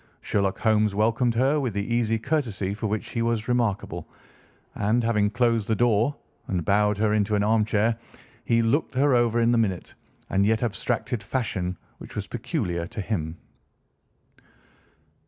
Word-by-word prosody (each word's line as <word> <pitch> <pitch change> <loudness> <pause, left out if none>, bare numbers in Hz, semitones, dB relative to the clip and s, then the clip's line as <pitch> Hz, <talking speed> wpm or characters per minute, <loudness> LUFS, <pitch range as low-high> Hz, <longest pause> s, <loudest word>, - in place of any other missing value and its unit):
Sherlock 100 -2 0
Holmes 110 -2 +2
welcomed 115 +3 +2
her 135 +5 +3
with 125 -7 -2
the 100 0 -1
easy 115 -1 +1
courtesy 110 -7 -1
for 110 +1 -3
which 105 +1 -3
he 115 - -2
was 115 -1 0
remarkable, 120 -5 -1 0.6
and, 110 +4 +1
having 105 -3 +2
closed 115 -2 +1
the 110 - +1
door 120 +4 +2 0.3
and 90 -4 -2
bowed 105 +2 +2
her 105 0 +2
into 105 0 +1
an 100 - +2
armchair, 110 +1 +2 0.5
he 115 0 +2
looked 135 +4 0
her 140 +1 +3
over 120 -1 +3
in 115 +1 +3
the 120 - +3
minute 95 -6 -1 0.4
and 95 +1 +3
yet 110 +3 +2
abstracted 115 0 -2
fashion 100 -6 -2 0.2
which - - -11
was - - -3
peculiar 85 -1 -3
to 105 - -8
him. 85 -6 -3
110 Hz, 155 wpm, -25 LUFS, 100-120 Hz, 0.6 s, her